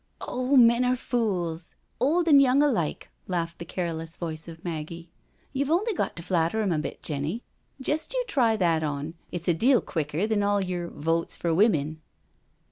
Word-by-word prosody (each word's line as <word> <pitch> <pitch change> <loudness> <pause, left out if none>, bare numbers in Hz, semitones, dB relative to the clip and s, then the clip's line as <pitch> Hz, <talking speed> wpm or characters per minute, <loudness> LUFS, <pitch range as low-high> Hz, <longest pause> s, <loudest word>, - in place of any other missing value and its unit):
" - - -42
Oh, 255 +2 +1
men 235 0 +6
are 250 0 +2
fules, 180 -10 -2 0.2
old 330 +6 +2
an* 290 -3 +8
young 275 +1 +5
alike," 220 - 0 0.2
laughed 170 -2 -2
the 170 - -6
careless 165 -2 -4
voice 160 -2 -5
of 165 0 -11
Maggie. 165 +1 -5 0.2
" - - -37
YouVe 280 +1 0
only 405 +8 +2
got - - -2
to 170 - -6
flatter 170 +3 +1
'em 195 - 0
a 160 - +1
bit, - - -6
Jenny. 150 - -3 0.4
Jest 295 +4 -1
you - - +1
try 235 - +2
that 170 -5 +2
on, 150 +1 -3 0.2
it's 175 -1 -3
a 175 - +4
deal 245 +9 +4
quicker 155 +3 -2
than 215 -1 +1
all 205 0 +2
yer 180 -2 -2
Votes 165 +2 -1
for 170 -1 -1
Women. 160 -6 +2
175 Hz, 190 wpm, -26 LUFS, 165-250 Hz, 0.4 s, an